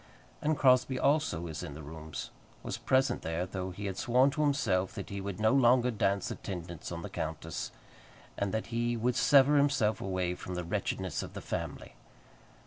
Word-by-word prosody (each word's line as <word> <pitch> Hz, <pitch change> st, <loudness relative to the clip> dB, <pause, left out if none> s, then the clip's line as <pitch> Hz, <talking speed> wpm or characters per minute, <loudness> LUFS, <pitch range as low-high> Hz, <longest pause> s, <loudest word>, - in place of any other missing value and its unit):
And 155 Hz, 0 st, +1 dB
Crosbie, 130 Hz, -1 st, +4 dB
also, 140 Hz, -, +2 dB
was 80 Hz, -2 st, -5 dB
in 75 Hz, -6 st, -6 dB
the 80 Hz, -, -8 dB
rooms, 80 Hz, 0 st, -7 dB, 0.3 s
was -, -, -4 dB
present 130 Hz, -1 st, +2 dB
there, 80 Hz, +2 st, -2 dB
though 95 Hz, 0 st, -4 dB
he 100 Hz, +3 st, -6 dB
had 95 Hz, -1 st, -3 dB
sworn 130 Hz, +2 st, +4 dB
to 150 Hz, -, -2 dB
himself 105 Hz, -11 st, +1 dB
that -, -, -6 dB
he 100 Hz, 0 st, -4 dB
would 100 Hz, -1 st, -5 dB
no 110 Hz, 0 st, +4 dB
longer 125 Hz, -1 st, +5 dB
dance 100 Hz, -3 st, 0 dB
attendance 85 Hz, -4 st, -6 dB
on 85 Hz, -1 st, -5 dB
the -, -, -4 dB
countess, 80 Hz, +1 st, -4 dB, 0.7 s
and 100 Hz, -1 st, -1 dB
that 110 Hz, +2 st, -2 dB
he 120 Hz, 0 st, 0 dB
would 120 Hz, +2 st, +1 dB
sever 145 Hz, +2 st, +6 dB
himself 135 Hz, -8 st, +2 dB
away 95 Hz, -2 st, -1 dB
from 90 Hz, 0 st, -6 dB
the 90 Hz, -, -2 dB
wretchedness 95 Hz, 0 st, -2 dB
of -, -, -8 dB
the -, -, -5 dB
family. -, -, -5 dB
100 Hz, 185 wpm, -31 LUFS, 90-130 Hz, 0.7 s, sever